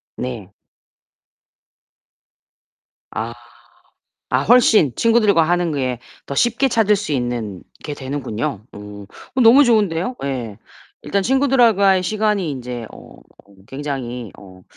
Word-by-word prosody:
네. 115 -7 -6 2.6
아. 115 +1 -4 1.0
아 130 +2 +2
훨씬 220 - +4
친구들과 215 -7 +3
하는 175 0 0
게 130 -4 -2 0.3
더 140 - -5
쉽게 240 - +2
찾을 210 -3 +2
수 195 -7 -4
있는 120 -7 -3 0.2
게 150 - -4
되는군요. 130 -7 -4
오. 105 0 -10
어 255 - -7
너무 245 +5 +7
좋은데요 215 -1 +1
예. 120 -7 -4 0.4
일단 200 -1 -1
친구들하 265 -2 +3
과의 190 -1 +3
시간이 210 -3 -1
인제 125 -4 -6
어 - - -14 0.5
굉장히 130 -5 -5
어 95 -2 -15
145 Hz, 210 characters per minute, -19 LUFS, -, 2.6 s, 너무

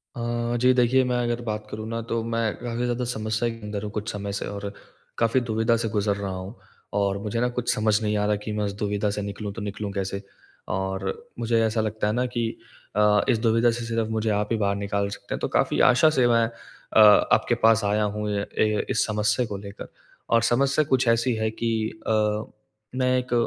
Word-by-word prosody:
अ, 120 0 -2
जी 130 0 +5
देखिए 125 +2 +4
मैं 125 - +1
अगर 120 0 -1
बात 105 -2 -4
करूँ 110 +1 -6
ना 115 0 -3
तो 115 0 0
मैं 115 -1 -1
काफ़ी 120 0 -3
ज़्यादा 125 0 -1
समस्या 110 +1 -1
के 115 0 -8
अंदर 105 -1 -4
हूँ 105 - -4
कुछ 105 0 -4
समय 100 -1 -4
से - - -4
और 100 0 -5 0.5
काफ़ी 115 +3 +3
दुविधा 115 0 +1
से 115 - -1
गुज़र 105 -1 0
रहा 100 -1 -4
हूँ। 95 +5 -6 0.4
और 100 -1 +1
मुझे 110 +2 -2
ना 125 - +2
कुछ 125 0 -1
समझ 110 0 +2
नहीं 105 -1 0
आ 105 - +1
रहा 105 0 +2
कि 110 - -4
मैं 105 0 -1
इस 100 - -3
दुविधा 105 0 0
से 105 +1 -3
निकलूँ 100 +1 -5
तो 115 - -7
निकलूँ 100 0 -4
कैसे। 100 0 -3 0.5
और 95 0 -2 0.3
मुझे 115 -1 +2
ऐसा 110 0 0
लगता 110 -1 -1
है 105 - +1
ना 125 +2 +1
कि 120 -2 -1 0.5
अ, 105 0 +4
इस 120 -4 +3
दुविधा 115 +1 +3
से 115 0 -4
सिर्फ 115 -1 -1
मुझे 110 0 -1
आप 105 0 0
ही 115 - +2
बाहर 100 -2 +1
निकाल 100 0 -1
सकते 100 - -7
हैं। - - -6
तो - - -1
काफ़ी - - +1
आशा 130 +5 +5
से 130 -5 +3
मैं 115 -1 +4
अ, 115 -1 -4 0.3
आपके - - +3
पास 115 -1 +5
आया 105 +1 +2
हूँ 105 0 -2
अ, 100 - -2
ए, 105 -1 +2
इस - - +2
समस्या 105 +2 +1
को 105 -3 -5
लेकर। 100 0 -9 0.4
और 115 0 +4
समस्या 140 +4 +3
कुछ 130 -2 +2
ऐसी 115 +2 +3
है 110 0 0
कि 115 +1 -2 0.4
अ, - - +1 0.8
मैं 130 0 +2
एक 125 -1 -3
110 Hz, 220 wpm, -25 LUFS, 105-120 Hz, 0.8 s, जी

